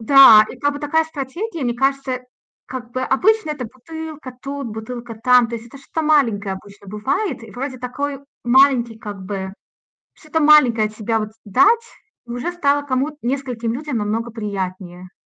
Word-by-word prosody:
Да, 225 Hz, -3 st, +9 dB
и -, -, -10 dB
как 290 Hz, +3 st, +1 dB
бы 285 Hz, -, -5 dB
такая 315 Hz, +2 st, +1 dB
стратегия. 320 Hz, +5 st, -5 dB
Мне 240 Hz, -, 0 dB
кажется, 270 Hz, 0 st, 0 dB, 0.5 s
как 250 Hz, -2 st, -7 dB
бы 255 Hz, -, -2 dB
обычно- 360 Hz, +7 st, +2 dB
это 285 Hz, -4 st, -4 dB
бутылка 300 Hz, +1 st, -9 dB
тут, 275 Hz, 0 st, -5 dB
бутылка 230 Hz, +2 st, -7 dB
там. 245 Hz, +1 st, +4 dB
То 235 Hz, -, -5 dB
есть 225 Hz, -, -10 dB
это 270 Hz, +4 st, -13 dB
что-то 320 Hz, +4 st, -4 dB
маленькое 230 Hz, -11 st, +2 dB
обычно 200 Hz, +1 st, -14 dB
бывает. 235 Hz, -, -2 dB
И 225 Hz, -, -11 dB
вроде 260 Hz, +2 st, -5 dB
такой 275 Hz, +3 st, -4 dB, 0.2 s
маленький 245 Hz, -3 st, +4 dB
как 205 Hz, -3 st, -7 dB
бы 190 Hz, -1 st, -4 dB, 0.6 s
что-то 315 Hz, 0 st, -3 dB
маленькое 260 Hz, -8 st, +6 dB
от 215 Hz, -, -15 dB
себя 225 Hz, +1 st, 0 dB
вот 215 Hz, -1 st, -4 dB
дать, 405 Hz, -, +4 dB, 0.4 s
и -, -, -12 dB
уже 245 Hz, +8 st, -3 dB
стало 290 Hz, -4 st, +1 dB
кому-то, 280 Hz, +3 st, -1 dB
нескольким 245 Hz, -3 st, -2 dB
людям 275 Hz, -1 st, -3 dB
намного 220 Hz, +3 st, -2 dB
приятнее. 185 Hz, -4 st, -5 dB
250 Hz, 170 wpm, -20 LUFS, 220-285 Hz, 0.6 s, Да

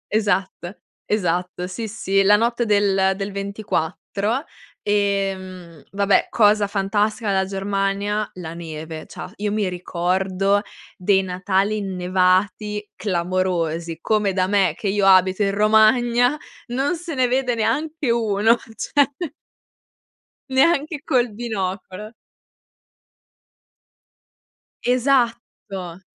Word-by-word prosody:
Esatto, 195 Hz, -3 st, -1 dB, 0.3 s
esatto, 180 Hz, -3 st, -1 dB
sì, 220 Hz, +5 st, -5 dB
sì, 195 Hz, -2 st, 0 dB
la 205 Hz, +1 st, +6 dB
notte 235 Hz, +2 st, 0 dB
del 195 Hz, -2 st, +3 dB
del 195 Hz, +1 st, -4 dB
24 200 Hz, -, -2 dB, 0.4 s
e, 200 Hz, -1 st, +1 dB
mhmm, 180 Hz, -4 st, -11 dB
vabbè, 200 Hz, 0 st, +2 dB
cosa 210 Hz, -2 st, +4 dB
fantastica 205 Hz, +2 st, 0 dB
della 190 Hz, -1 st, +2 dB
Germania: 195 Hz, +2 st, -1 dB
la 170 Hz, -3 st, -7 dB
neve. 160 Hz, -1 st, -7 dB
C'ha -, -, -9 dB
io 210 Hz, 0 st, -2 dB
mi 210 Hz, -2 st, 0 dB
ricordo 185 Hz, +3 st, 0 dB, 0.4 s
dei 190 Hz, +1 st, +2 dB
Natali 190 Hz, +3 st, 0 dB
innevati 190 Hz, +2 st, 0 dB
clamorosi, 170 Hz, -3 st, -1 dB
come 210 Hz, -3 st, +1 dB
da 185 Hz, -1 st, +1 dB
me, 190 Hz, -4 st, +2 dB
che 210 Hz, -, -4 dB
io 195 Hz, 0 st, +2 dB
abito 185 Hz, +1 st, +5 dB
in 195 Hz, 0 st, +1 dB
Romagna, 235 Hz, +5 st, +4 dB, 0.3 s
non 270 Hz, +8 st, 0 dB
se 335 Hz, -2 st, -6 dB
ne 255 Hz, -1 st, +3 dB
vede 250 Hz, -1 st, 0 dB
neanche 285 Hz, +5 st, -1 dB
uno, 225 Hz, -1 st, +3 dB, 0.2 s
cioè 285 Hz, +5 st, +2 dB, 1.4 s
neanche 290 Hz, +2 st, +2 dB
col 245 Hz, -3 st, +2 dB
binocolo. 205 Hz, -2 st, -4 dB, 2.7 s
Esatto! 235 Hz, -8 st, -1 dB
200 Hz, 105 wpm, -21 LUFS, 185-220 Hz, 2.7 s, la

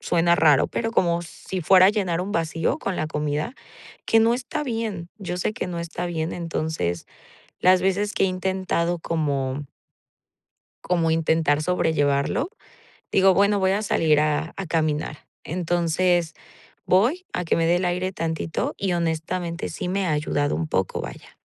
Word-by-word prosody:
suena 170 Hz, 0 st, +2 dB
raro, 150 Hz, -4 st, +4 dB
pero 225 Hz, -1 st, -2 dB
como 170 Hz, -5 st, +2 dB
si 180 Hz, +2 st, -6 dB
fuera 185 Hz, +2 st, +7 dB
a -, -, +6 dB
llenar 185 Hz, -5 st, -1 dB
un 190 Hz, +3 st, -4 dB
vacío 165 Hz, -2 st, 0 dB
con 195 Hz, -, -3 dB
la 155 Hz, -, -1 dB
comida, 150 Hz, -, -2 dB, 0.5 s
que 225 Hz, -, +5 dB
no 225 Hz, +1 st, +4 dB
está 260 Hz, +4 st, -4 dB
bien. 225 Hz, -9 st, -3 dB
Yo 180 Hz, -3 st, -4 dB
sé 195 Hz, -, -1 dB
que -, -, -3 dB
no 170 Hz, -1 st, -4 dB
está 170 Hz, +1 st, -4 dB
bien, 165 Hz, -1 st, -2 dB
entonces 160 Hz, -, -3 dB, 0.5 s
las 185 Hz, 0 st, +5 dB
veces 200 Hz, +2 st, +1 dB
que -, -, +1 dB
he 195 Hz, -, +4 dB
intentado 185 Hz, -2 st, -1 dB
como 145 Hz, -4 st, -2 dB, 1.2 s
como 170 Hz, -2 st, +1 dB
intentar 160 Hz, -2 st, +2 dB
sobrellevarlo, 160 Hz, -, +1 dB, 0.6 s
digo: 190 Hz, 0 st, +5 dB
"Bueno, 200 Hz, +1 st, +3 dB
voy 190 Hz, 0 st, +2 dB
a 205 Hz, +2 st, +1 dB
salir 160 Hz, -7 st, +2 dB
a 155 Hz, +1 st, 0 dB
a 195 Hz, -, -4 dB
caminar". 155 Hz, -2 st, -1 dB, 0.2 s
Entonces, 175 Hz, 0 st, 0 dB, 0.5 s
voy 245 Hz, -, +2 dB
a 180 Hz, -, -2 dB
que -, -, +2 dB
me 165 Hz, -, +1 dB
dé 170 Hz, -, +4 dB
el 185 Hz, -, -1 dB
aire 180 Hz, +1 st, -1 dB
tantito, 160 Hz, -1 st, -2 dB
y 190 Hz, -2 st, -1 dB
honestamente, 170 Hz, +1 st, -2 dB
sí 180 Hz, -, -4 dB
me 195 Hz, +1 st, 0 dB
ha 160 Hz, -, +1 dB
ayudado 145 Hz, -1 st, 0 dB
un 165 Hz, -, -2 dB
poco, 95 Hz, -, -1 dB
vaya. -, -, -10 dB
170 Hz, 165 wpm, -24 LUFS, 160-190 Hz, 1.2 s, fuera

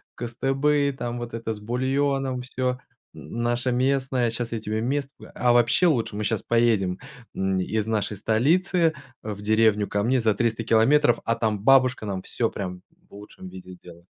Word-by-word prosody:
кыстыбый 135 Hz, +4 st, 0 dB
там, 120 Hz, -2 st, -5 dB
вот 120 Hz, -1 st, -7 dB
это 115 Hz, -1 st, -3 dB
с 105 Hz, -, -10 dB
бульоном 130 Hz, +3 st, -1 dB
всё, 125 Hz, 0 st, -2 dB, 0.4 s
наше 120 Hz, +7 st, -2 dB
местное, 130 Hz, -1 st, +1 dB
щас 115 Hz, +1 st, -4 dB
я 115 Hz, -, -2 dB
тебе 110 Hz, +1 st, -3 dB
мест 140 Hz, +3 st, -1 dB, 0.3 s
А 120 Hz, -1 st, +3 dB
вообще, 120 Hz, +9 st, +4 dB
лучше 115 Hz, -8 st, 0 dB
мы 105 Hz, -, -2 dB
щас 110 Hz, -1 st, -1 dB
поедем, 110 Hz, -6 st, +1 dB, 0.3 s
м, 95 Hz, -1 st, -1 dB
из 110 Hz, +3 st, -2 dB
нашей 105 Hz, -2 st, -1 dB
столицы 160 Hz, -, +2 dB, 0.3 s
в 105 Hz, -2 st, -6 dB
деревню 110 Hz, -1 st, +2 dB
ко 100 Hz, 0 st, -1 dB
мне 130 Hz, +3 st, +2 dB
за 110 Hz, -2 st, +2 dB
300 115 Hz, -1 st, -1 dB
километров, 120 Hz, +4 st, +4 dB
а 115 Hz, -, 0 dB
там 110 Hz, -3 st, -1 dB
бабушка 130 Hz, -3 st, +4 dB
нам 95 Hz, -2 st, -3 dB
всё 115 Hz, -2 st, -1 dB
прям 90 Hz, -2 st, -6 dB, 0.3 s
в -, -, -23 dB
лучшем 100 Hz, -2 st, -11 dB
виде 95 Hz, 0 st, -11 dB
сделает". 85 Hz, -1 st, -14 dB
115 Hz, 170 wpm, -24 LUFS, 105-130 Hz, 0.4 s, вообще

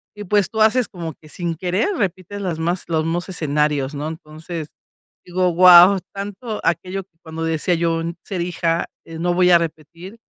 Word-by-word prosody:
y, 210 Hz, -, -7 dB
pues, 205 Hz, -1 st, +2 dB
tú 220 Hz, -1 st, -1 dB
haces 225 Hz, +2 st, +4 dB
como 170 Hz, -5 st, -6 dB
que 155 Hz, -, -19 dB
sin 170 Hz, -1 st, -3 dB
querer 185 Hz, -, -1 dB
repites 195 Hz, +1 st, -3 dB
las 170 Hz, -4 st, -3 dB
más 175 Hz, +2 st, -1 dB
los 160 Hz, -2 st, 0 dB
mos 175 Hz, +3 st, -2 dB
escenarios, 150 Hz, -4 st, 0 dB
¿no? 150 Hz, +2 st, -4 dB
Entonces, 160 Hz, 0 st, -7 dB, 0.6 s
digo: 180 Hz, 0 st, +1 dB
"¡Guau!, 180 Hz, +2 st, +8 dB
tanto 205 Hz, +3 st, -6 dB
aquello 185 Hz, +3 st, -1 dB, 0.2 s
cuando 160 Hz, 0 st, -6 dB
decía 165 Hz, +2 st, 0 dB
yo, 165 Hz, 0 st, 0 dB, 0.2 s
'ser 185 Hz, -3 st, -4 dB
hija, 170 Hz, -1 st, -1 dB, 0.2 s
eh, 165 Hz, 0 st, -9 dB
no 175 Hz, +1 st, +1 dB
voy 180 Hz, 0 st, +3 dB
a 170 Hz, -, +8 dB
repetir'", 170 Hz, +5 st, -7 dB
175 Hz, 175 wpm, -20 LUFS, 160-185 Hz, 0.6 s, Guau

